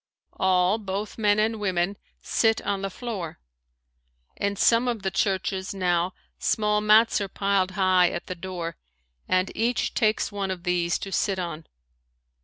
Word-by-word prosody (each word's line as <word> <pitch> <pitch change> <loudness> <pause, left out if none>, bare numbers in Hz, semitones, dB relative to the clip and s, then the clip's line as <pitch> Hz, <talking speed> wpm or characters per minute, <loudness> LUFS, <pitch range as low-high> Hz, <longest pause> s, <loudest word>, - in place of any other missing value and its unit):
All, 185 +2 +3
both 205 +2 -4
men 205 -1 +3
and 220 +1 +1
women, 190 -1 0 0.3
sit 225 -1 +2
on 200 -1 -1
the 195 - -2
floor. 190 -6 -6 1.0
In 200 0 -1
some 230 +4 +3
of 230 -5 -2
the 190 - -1
churches 190 0 -1
now 180 -1 +1 0.3
small 210 -1 +1
mats 215 +1 +5
are 200 - -2
piled 195 -1 +1
high 185 -2 +4
at 170 - -5
the - - -4
door 175 -2 -6 0.5
and 185 +1 +1
each 235 +3 0
takes 215 -1 +1
one 200 -1 -3
of 185 -2 -4
these 175 -1 +1
to 195 - -7
sit 195 0 0
on. 170 -3 -5
195 Hz, 155 wpm, -25 LUFS, 180-210 Hz, 1.0 s, mats